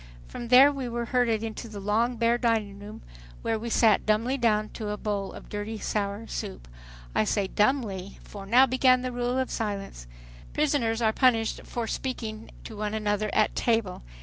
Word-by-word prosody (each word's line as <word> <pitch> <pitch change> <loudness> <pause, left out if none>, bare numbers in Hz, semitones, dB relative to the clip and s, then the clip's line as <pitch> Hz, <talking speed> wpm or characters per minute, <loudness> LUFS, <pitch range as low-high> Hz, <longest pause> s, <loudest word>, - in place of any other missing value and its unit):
From 240 - -7
there 260 +4 +8
we 270 -3 -4
were 235 0 -3
herded 230 -3 +1
into 225 +1 -5
the 210 -2 -7
long 220 +5 +1
bare 235 +1 +2
dining 220 -4 0
room 205 - -10 0.4
where 225 -1 0
we 235 +2 -5
sat 220 -3 +4
dumbly 225 +5 +1
down 215 -4 +1
to 215 -2 -6
a 210 - -3
bowl 200 -2 -3
of - - -11
dirty 210 +2 -5
sour 205 +1 -2
soup. - - -6 0.5
I - - +3
say 200 - 0
dumbly—for 200 -3 -2
now 250 +5 +6
began 255 0 +3
the 255 - -2
rule 245 +1 -1
of 260 0 -1
silence. 200 - -4 0.5
Prisoners 240 -6 +1
are 220 0 +3
punished 225 -3 +2
for 235 -1 -3
speaking 225 -2 -4
to 220 - -9
one 210 +1 -3
another 210 0 -1
at 215 - +2
table. 225 -6 0
225 Hz, 175 wpm, -27 LUFS, 210-245 Hz, 0.5 s, there